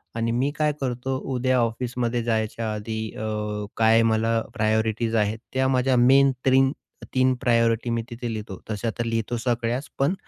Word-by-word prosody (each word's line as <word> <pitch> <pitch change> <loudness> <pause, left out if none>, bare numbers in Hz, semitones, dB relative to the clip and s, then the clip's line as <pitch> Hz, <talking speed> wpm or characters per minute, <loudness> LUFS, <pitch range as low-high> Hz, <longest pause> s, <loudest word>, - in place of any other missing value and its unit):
आणि 115 0 0
मी 130 +4 +1
काय 150 -1 +2
करतो? 130 +1 -2 0.2
उद्या 130 +1 +1
ऑफिसमध्ये 120 +1 -1
जायच्या 110 -1 -1
आधी 110 +1 -4 0.2
अ, 110 - -3 0.5
काय 115 0 +5
मला 115 +1 +1
प्रायोरिटीज 110 +1 0
आहेत, 110 +1 +1
त्या 130 0 +2
माझ्या 130 0 +2
मेन 135 +3 +6
3-3 130 -1 +1
प्रायोरिटी 115 -2 +2
मी 115 0 0
तिथे 120 0 -5
लिहितो. 105 -3 -6
तशा 110 +2 -2
तर 120 - -1
लिहितो 115 +1 -1
सगळ्याच. 120 +2 -1
पण 140 +6 +2
115 Hz, 150 wpm, -24 LUFS, 115-130 Hz, 0.5 s, मेन